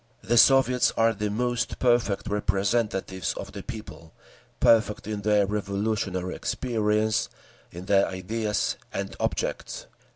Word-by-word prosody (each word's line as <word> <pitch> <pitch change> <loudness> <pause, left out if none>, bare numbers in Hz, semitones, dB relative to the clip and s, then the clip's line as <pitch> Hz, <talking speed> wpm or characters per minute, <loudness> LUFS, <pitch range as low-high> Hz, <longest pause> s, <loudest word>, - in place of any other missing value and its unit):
"The 120 - +1
Soviets 130 -1 +5
are 115 0 +4
the 105 0 -3
most 120 +3 -1
perfect 120 -5 +1
representatives 100 -2 -1
of - - -7
the - - -7
people—perfect 110 0 -2
in 105 -1 -4
their 105 -1 +3
revolutionary 100 -2 -2
experience, 110 -3 0 0.4
in 90 +2 -9
their 100 0 +3
ideas 105 +3 -2
and - - -4
objects. - - -3
105 Hz, 110 wpm, -26 LUFS, 100-115 Hz, 0.4 s, Soviets